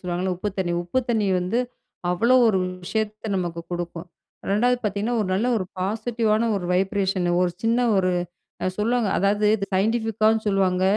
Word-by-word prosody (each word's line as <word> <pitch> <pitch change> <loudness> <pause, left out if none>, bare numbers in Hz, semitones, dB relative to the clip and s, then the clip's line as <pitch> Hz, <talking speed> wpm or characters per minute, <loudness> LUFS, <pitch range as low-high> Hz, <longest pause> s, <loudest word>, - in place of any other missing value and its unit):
சொல்லுவாங்கல்ல? 180 +1 -2
உப்பு 205 +3 -3
தண்ணி. 175 -2 0
உப்பு 175 +9 -1
தண்ணி 220 -3 +1
வந்து 185 +7 -1 0.5
அவ்வளவு 240 +8 +4
1 190 -3 +2 0.2
விஷயத்த 215 +3 -3
நமக்கு 170 -2 -3
குடுக்கும். 175 0 -5 0.4
2வது 245 +5 +3
பார்த்தீங்கன்னா, 210 +3 -1
1 200 - -1
நல்ல 220 +6 +1
1 195 - -1
பாசிட்டிவான 220 +3 0
1 185 - -4
வைப்ரேஷன் 190 -1 0
1 180 - +1
சின்ன 230 +1 +2 0.2
1 185 -1 +2 0.7
சொல்லுவாங்க, 230 0 +1
அதாவது 205 +2 +2
இது 200 -2 -4
சயின்டிஃபிக்காவும் 220 +1 +1
சொல்லுவாங்க 185 -2 +1
200 Hz, 150 wpm, -23 LUFS, 185-225 Hz, 0.7 s, அவ்வளவு